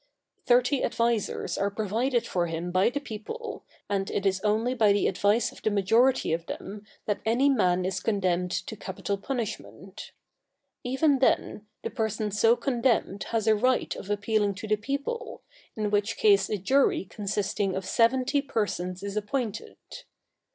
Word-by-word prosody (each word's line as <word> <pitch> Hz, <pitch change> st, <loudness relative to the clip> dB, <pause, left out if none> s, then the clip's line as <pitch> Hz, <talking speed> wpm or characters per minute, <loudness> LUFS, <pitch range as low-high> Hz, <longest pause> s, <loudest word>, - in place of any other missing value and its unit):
Thirty 250 Hz, +2 st, +3 dB
advisers 230 Hz, -2 st, -1 dB
are 200 Hz, -, +1 dB
provided 225 Hz, +5 st, 0 dB
for 175 Hz, -2 st, -1 dB
him 165 Hz, +2 st, -4 dB
by 185 Hz, +4 st, +3 dB
the 285 Hz, -, -3 dB
people, 295 Hz, -, -7 dB, 0.2 s
and 195 Hz, -1 st, -1 dB
it 200 Hz, -, -2 dB
is 190 Hz, -1 st, +1 dB
only 220 Hz, +4 st, +1 dB
by 220 Hz, -5 st, +4 dB
the 205 Hz, -, +2 dB
advice 205 Hz, +4 st, +2 dB
of -, -, -15 dB
the -, -, +1 dB
majority 225 Hz, +2 st, +3 dB
of 165 Hz, +1 st, -3 dB
them 205 Hz, +2 st, -7 dB, 0.2 s
that 205 Hz, -, -1 dB
any 245 Hz, +6 st, +3 dB
man 185 Hz, -8 st, +2 dB
is 185 Hz, 0 st, -1 dB
condemned 185 Hz, -4 st, 0 dB
to 185 Hz, +4 st, -4 dB
capital 195 Hz, 0 st, -4 dB
punishment. 195 Hz, -, -6 dB, 0.7 s
Even 270 Hz, +3 st, +2 dB
then, 215 Hz, -4 st, +1 dB, 0.2 s
the -, -, -3 dB
person 220 Hz, -3 st, -2 dB
so 225 Hz, +3 st, +4 dB
condemned 240 Hz, -6 st, 0 dB
has 225 Hz, -2 st, -1 dB
a 220 Hz, -, +5 dB
right 250 Hz, +4 st, +1 dB
of 195 Hz, -, -9 dB
appealing 205 Hz, 0 st, 0 dB
to 200 Hz, +3 st, -7 dB
the 215 Hz, -, +3 dB
people, 280 Hz, -, -4 dB, 0.3 s
in 215 Hz, -1 st, -2 dB
which 205 Hz, +1 st, 0 dB
case 200 Hz, -2 st, +4 dB
a 210 Hz, -, 0 dB
jury 260 Hz, +2 st, +2 dB
consisting 200 Hz, -1 st, -2 dB
of 190 Hz, 0 st, -3 dB
seventy 255 Hz, +7 st, +2 dB
persons 190 Hz, -8 st, -3 dB
is 200 Hz, 0 st, -4 dB
appointed. 220 Hz, 0 st, -3 dB
210 Hz, 160 wpm, -27 LUFS, 195-240 Hz, 0.7 s, a